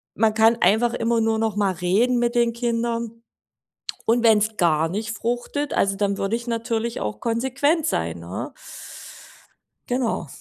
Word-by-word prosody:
man 220 0 +2
kann 225 +1 +4
einfach 225 +6 +3
immer 230 0 +1
nur 225 0 +1
nochmal 210 -3 0
reden 200 +9 +2
mit 240 0 +1
den 235 -1 +2
Kindern. 235 -1 -2 0.8
Und 235 +1 +2
wenn's 220 -1 +3
gar 165 -2 +2
nicht 215 +5 -3
fruchtet, 245 +6 -3
also, 195 0 +1
dann 200 0 -1
würde 195 +3 0
ich 235 0 -5
natürlich 230 0 -2
auch 105 0 -4
konsequent 265 +7 0
sein, 80 +1 -2
ne? 85 +3 -6 1.3
Genau. 245 -8 -1
225 Hz, 145 wpm, -23 LUFS, 200-235 Hz, 1.3 s, kann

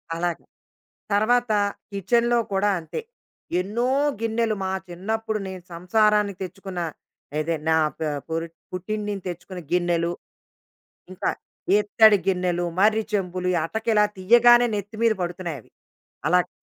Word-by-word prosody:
అలాగా. 170 0 -2 0.7
తరువాత 235 +3 +3 0.4
కిచెన్‌లో 235 +5 +2
కూడా 195 +2 +2
అంతే. 165 - -6 0.6
ఎన్నో 230 +6 -1 0.3
గిన్నెలు, 225 -1 0
మా 190 - -1 0.2
చిన్నప్పుడు 220 +5 -2
నేను 185 -2 -7
సంసారాన్ని 210 +4 +2
తెచ్చుకున్న, 190 0 -6 0.6
ఏది 165 +2 0
నా 160 - +5 0.2
ప - - -54 0.3
పురిట్ 165 +1 -3 0.2
పుట్టింటి 205 +4 -3
నుంచి 200 -2 -4
తెచ్చుకున్న 175 +1 -7
గిన్నెలు, 175 -1 +1 1.0
ఇంకా 185 - -1 0.5
ఇత్తడి 210 0 +5
గిన్నెలు, 180 -2 +1
మర్రి 215 +2 +4
చెంబులు, 180 -2 -1 0.2
అటక 220 +6 -5
ఇలా 210 0 +5
తీయగానే 240 +5 +6
నెత్తి 205 +1 -5
మీద 230 -1 +5
పడుతున్నాయవి. 175 - -5 0.6
అలాగా 180 0 +3
195 Hz, 115 wpm, -24 LUFS, 175-220 Hz, 1.0 s, తీయగానే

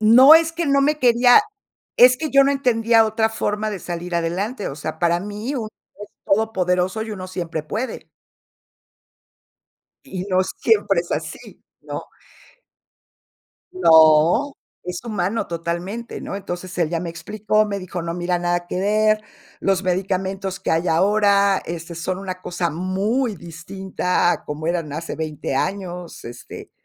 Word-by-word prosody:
No 250 +8 +8
es 325 0 +4
que 340 0 -2
no 275 0 +3
me 300 +2 +2
quería 245 - +6 0.6
es 250 +1 +8
que 310 +2 -4
yo 275 0 +6
no 275 - +2
entendía 230 -4 +3
otra 220 +1 +1
forma 215 -1 -2
de 200 - -4
salir 175 0 -6
adelante, 190 +7 -2
o 140 - -7
sea, 155 +1 -5
para 170 0 +2
mí 210 +7 -5
uno 225 -5 -3 0.3
es 205 - -8 0.2
todopoderoso, 190 -1 0
y 220 - -7
uno 185 -2 -7
siempre 170 -4 -4
puede. 220 +11 -5 2.0
Y 185 -1 -6
no 185 -1 +2
siempre 205 -3 +1
es 175 - -12
así, - - -6 0.2
¿no? - - -6 1.7
No, 160 - +5 0.3
es 180 +2 -6
humano 215 -1 -2
totalmente, 170 +7 -5
¿no? - - -5
Entonces, 185 -2 -6
él 170 -3 +1
ya 170 -1 -1
me 175 - -4
explicó, 215 +6 0
me 200 -1 -3
dijo: 180 -1 -6
"No 170 0 -4
mira 175 0 -1
nada 175 0 -1
que 180 - -4
ver, 215 +2 +2 0.4
los 195 0 0
medicamentos 190 +1 -2
que - - -2
hay 165 +2 +1
ahora, 200 +2 +3
este, 170 0 -6
son 180 +2 -3
una 185 -1 -6
cosa 175 -1 -2
muy 200 - -1
distinta 180 +1 -2
a - - -4
como 150 +2 -5
eran 170 -4 -2
hace 165 +2 -5
20 155 -3 -4
años, 180 +1 -4
este, 120 +1 -10
190 Hz, 150 wpm, -21 LUFS, 175-215 Hz, 2.0 s, No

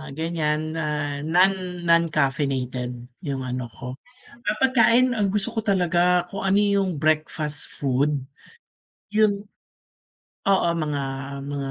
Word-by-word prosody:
ah, 155 - -9
ganiyan, 155 +1 -2
ah, 150 -2 -2
non 180 +2 +1
non-caffeinated 140 -6 +1 0.3
yung 140 -6 -4
ano 125 -1 -4
ko 125 +2 -8 0.4
ah, 235 -3 -4
pagkain, 255 -1 +4
ang 200 -3 +1
gusto 205 0 0
ko 220 - -1
talaga 180 -2 +2
kung 195 +2 -6
ano 195 +1 +3
yung 200 -6 +1
breakfast 155 -1 0
food, 140 +2 +1 0.9
yun 210 -1 +2 1.0
oo, 195 -3 +3
mga 150 -3 -2 0.4
mga 140 -1 -4
160 Hz, 120 wpm, -24 LUFS, 145-195 Hz, 1.0 s, pagkain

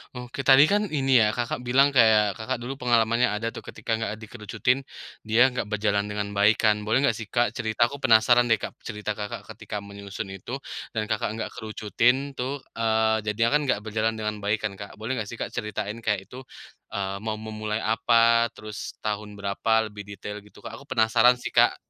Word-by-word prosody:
Oke, 125 +1 -8
tadi 135 +1 +9
kan 205 +1 +3 0.2
ini 135 -1 0
ya, 110 - +5
Kakak, 120 -1 -2
bilang 135 +3 +5
kayak, 110 -6 +4
Kakak, 125 +3 -2
dulu 130 +3 -4
pengalamannya 120 0 +3
ada 115 +2 -2
tuh - - -8
ketika - - -6
nggak 115 -1 -2
dikerucutin, 110 +4 -1 0.5
dia 110 +2 +3
nggak 125 -5 -3
berjalan 105 -1 0
dengan 105 0 -3
baik 100 +2 +4
kan, 105 -1 +2
boleh 120 +5 +2
nggak 130 -5 +3
sih, 110 - -6
Kak, 120 +2 +1
cerita, 110 +1 +1
aku 140 - -7
penasaran 120 -1 +5
deh, 115 - +5
Kak, - - -6
cerita, 105 -1 -5
Kakak, 105 0 -5
ketika 105 -1 -6
menyusun 100 0 -7
itu 95 +6 -6 0.4
dan, 110 - 0
Kakak, 110 0 -1
nggak 115 - -4
kerucutin 115 +5 0
tuh, 135 +1 -4 0.2
eee, 110 -1 +2
jadinya 115 +2 +2
kan - - -3
nggak 125 - +1
berjalan 110 +1 -1
dengan 105 -1 -3
baik 105 +2 -1
kan, 110 -2 -2
Kak, 100 - -9
boleh 110 +3 -5
nggak 105 - -4
sih, 115 - -7
Kak, - - -5
ceritain 105 +1 -4
kayak 105 -4 -2
itu, 125 - -8 0.6
eee, 100 -1 -2
mau 110 +1 -3
memulai 110 0 -4
apa, 115 +1 +4
terus 110 -1 -7
tahun 105 -1 -3
berapa 105 +2 0
lebih 105 -1 -9
detail 105 +2 -7
gitu, 105 0 -18
Kak? - - -8
Aku 140 - -16
penasaran 120 -1 +4
sih, 125 - -6
Kak. - - +4
110 Hz, 195 wpm, -25 LUFS, 105-120 Hz, 0.6 s, tadi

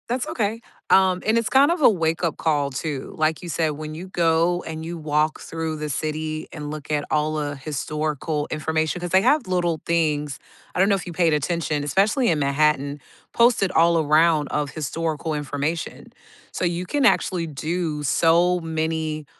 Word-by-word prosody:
That's 245 +1 -1
okay, 220 0 -1 0.3
um, 185 -1 +4
and 220 +2 +3
it's 230 - 0
kind 270 +5 +5
of 345 -2 -1
a - - +8
wake 165 -5 0
up 170 -4 0
call 145 -3 0
too, 140 0 -5
like 155 0 +1
you 175 - -8
said, 160 -1 0
when 155 +1 -7
you 180 +4 -8
go 170 0 +2
and 160 0 -6
you 170 +1 -5
walk 155 0 0
through 160 -1 -4
the 150 0 -4
city 155 +2 -3
and 150 -2 -6
look 155 0 -7
at 150 -1 0
all 155 0 0
a 145 -1 -3
historical 150 +1 -3
information 160 +2 -1
'cause 175 -1 -5
they 190 - +5
have 260 +3 +2
little 175 -3 0
things, 150 -4 0 0.4
I - - -1
don't 195 +2 +4
know 200 - +4
if 190 - -5
you 175 - -6
paid 165 -2 +2
attention, 150 -1 -1
especially 210 - +2
in 160 -3 +2
Manhattan, 145 0 +1 0.3
posted 235 -5 +3
all 170 0 +4
around 155 0 +3
of 145 -2 -2
historical 160 +1 -3
information, 150 +2 -4 0.4
so - - -2
you 175 +1 -1
can 285 +8 0
actually 180 -5 +2
do 155 +1 -3
so 170 +5 +3
many, 160 -1 -2
160 Hz, 185 wpm, -23 LUFS, 150-175 Hz, 0.4 s, a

